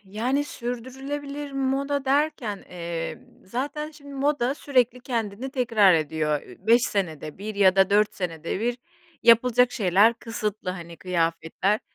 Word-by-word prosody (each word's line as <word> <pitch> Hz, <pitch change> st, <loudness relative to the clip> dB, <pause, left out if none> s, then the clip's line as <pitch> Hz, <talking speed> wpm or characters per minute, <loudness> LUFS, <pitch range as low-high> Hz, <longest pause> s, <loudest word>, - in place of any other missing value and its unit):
Yani, 240 Hz, +9 st, -1 dB
sürdürülebilir 275 Hz, +4 st, -5 dB
moda 275 Hz, +1 st, -1 dB
derken, 270 Hz, -7 st, 0 dB
eee, 170 Hz, -2 st, -4 dB, 0.3 s
zaten, 285 Hz, +8 st, -4 dB
şimdi, 285 Hz, -2 st, -12 dB
moda 275 Hz, -2 st, +1 dB
sürekli 250 Hz, -4 st, +1 dB
kendini 235 Hz, -1 st, -3 dB
tekrar 230 Hz, -, +4 dB
ediyor. 155 Hz, -1 st, 0 dB
Üüü, -, -, -15 dB
5 235 Hz, +1 st, +6 dB
senede 160 Hz, -, -2 dB
1 215 Hz, +2 st, -5 dB
ya 195 Hz, -2 st, +4 dB
da 195 Hz, 0 st, +4 dB
4 210 Hz, +1 st, +3 dB
senede 170 Hz, 0 st, -4 dB
1 240 Hz, +2 st, -1 dB, 0.4 s
yapılacak 245 Hz, +1 st, +5 dB
şeyler 205 Hz, +2 st, +4 dB
kısıtlı, 215 Hz, -4 st, -4 dB
hani, 170 Hz, -2 st, -8 dB
kıyafetler, 170 Hz, +3 st, 0 dB
230 Hz, 130 wpm, -25 LUFS, 190-265 Hz, 0.4 s, 5